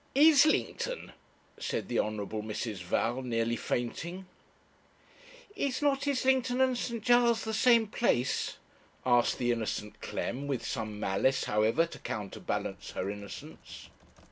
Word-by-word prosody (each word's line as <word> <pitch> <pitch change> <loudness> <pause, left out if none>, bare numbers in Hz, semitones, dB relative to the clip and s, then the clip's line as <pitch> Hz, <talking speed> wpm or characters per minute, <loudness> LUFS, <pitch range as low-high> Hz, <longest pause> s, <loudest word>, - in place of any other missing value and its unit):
'Islington!' 310 - +4 0.5
said - - -2
the 120 - 0
Honourable 105 0 -2
Mrs. 110 0 -4
Val, 115 +8 -1
nearly 115 -2 0
fainting. 170 +12 -3 1.3
'Is 280 -7 -1
not 280 -1 +2
Islington 260 -2 +2
and 260 -1 +3
St. 235 -2 -3
Giles' 240 -1 +4
the 220 - -3
same 230 0 +5
place?' 205 - 0 0.5
asked 120 -1 +3
the 120 -1 +1
innocent 105 -2 -3
Clem, 140 +4 -3
with 135 -3 -2
some 110 -4 -4
malice, 120 +7 +1
however, 110 +10 +2
to 170 - -11
counterbalance 105 -3 -4
her 95 +2 -2
innocence. 100 -1 -10
130 Hz, 120 wpm, -30 LUFS, -, 1.3 s, same